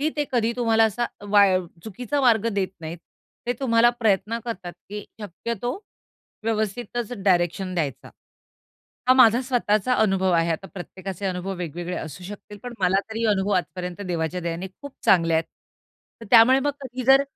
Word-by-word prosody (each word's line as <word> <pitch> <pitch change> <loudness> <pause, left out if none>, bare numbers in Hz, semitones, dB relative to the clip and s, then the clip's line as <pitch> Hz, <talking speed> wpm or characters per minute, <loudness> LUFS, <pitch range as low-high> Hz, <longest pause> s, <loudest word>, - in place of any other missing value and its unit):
ही 310 +2 +1
ते 295 - +1
कधी 235 -1 +2
तुम्हाला 225 -2 +3
असा 230 +3 0 0.2
वाई 200 -3 +6 0.3
चुकीचा 245 +6 -3
मार्ग 230 -3 +4
देत 200 -3 -1
नाहीत. 160 +1 -6 0.5
ते 245 - +2
तुम्हाला 235 -2 +4
प्रयत्न 215 +1 +1
करतात 185 -7 -5 0.2
की 210 -1 -6 0.2
शक्यतो 235 - -4 0.7
व्यवस्थितच 225 +2 -2
डायरेक्शन 185 0 +1
द्यायचा. 145 -8 -3 1.0
हा - - +9
माझा 245 -2 +6
स्वतःचा 245 -2 +1
अनुभव 190 -4 +2
आहे. 165 0 +2
आता 195 +4 -5
प्रत्येकाचे 190 +1 -6
अनुभव 185 +1 -3
वेगवेगळे 175 +1 -4
असू 160 +3 -7
शकतील. 205 +1 -9
पण 245 -1 -7
मला 190 +1 +3
तरी 225 +1 -2
अनुभव 200 +1 0
आजपर्यंत 180 +1 -4
देवाच्या 170 0 -2
दयेने 170 +2 -3 0.2
खूप 285 -1 -9
चांगले 165 -3 +4
आहेत. 160 +1 +2 0.8
तर 225 - -9
त्यामुळे 240 +3 +7
मग 290 +1 +1
कधी 255 -1 -6
जर 270 +1 +6
205 Hz, 155 wpm, -24 LUFS, 180-235 Hz, 1.0 s, हा